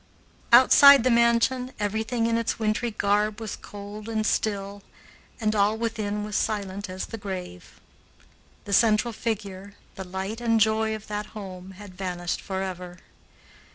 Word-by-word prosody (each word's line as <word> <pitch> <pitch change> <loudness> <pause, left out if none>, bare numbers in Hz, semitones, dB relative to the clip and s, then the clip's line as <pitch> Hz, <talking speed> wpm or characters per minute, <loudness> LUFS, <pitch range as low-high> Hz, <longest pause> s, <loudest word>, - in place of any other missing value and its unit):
Outside 260 +2 +8
the 255 - +3
mansion 235 +2 +2
everything 220 +3 -1
in 230 0 +1
its 230 0 -1
wintry 220 +2 -1
garb 210 0 0
was 220 -2 -5
cold 205 +1 -9
and 220 -1 -1
still, 200 -2 -1 0.6
and 215 -2 0
all 210 +1 +2
within 215 -2 -3
was 210 -1 -5
silent 200 -2 -2
as 185 +1 -5
the 225 - -8
grave. 185 - -8 0.9
The 200 - -4
central 225 +2 +3
figure, 200 -3 -5 0.2
the 190 - -7
light 190 +5 -5
and 230 -1 +2
joy 220 0 +2
of 215 - -10
that 210 0 -4
home, 190 -2 -9
had 205 -2 -11
vanished 180 -2 -4
forever. 185 -2 -5
210 Hz, 145 wpm, -25 LUFS, 195-225 Hz, 0.9 s, Outside